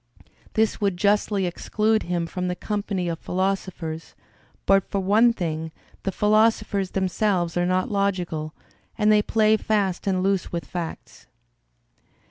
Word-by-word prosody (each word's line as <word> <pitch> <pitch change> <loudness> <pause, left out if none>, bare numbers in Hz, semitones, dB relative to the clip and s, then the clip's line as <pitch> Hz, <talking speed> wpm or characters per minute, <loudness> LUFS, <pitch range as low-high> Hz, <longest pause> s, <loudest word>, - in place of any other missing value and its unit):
This 220 0 +1
would 200 -3 +1
justly 205 0 +2
exclude 215 +5 0
him 175 -1 -2
from 180 +2 -3
the 180 - -1
company 200 -3 -2
of 165 -1 -3
philosophers, 185 -4 -3 0.5
but 195 -1 +3
for 200 - -1
one 210 +5 +4
thing: 160 -6 -3 0.3
the 195 - -2
philosophers 210 -1 +2
themselves 185 -2 0
are 175 0 +1
not 185 +2 0
logical, 180 -6 -1 0.4
and 215 -1 +4
they 210 0 +5
play 215 0 +3
fast 200 -4 -1
and 185 -1 +1
loose 195 -2 0
with 170 -1 -3
facts. 165 -9 -7
190 Hz, 135 wpm, -24 LUFS, 175-210 Hz, 0.5 s, they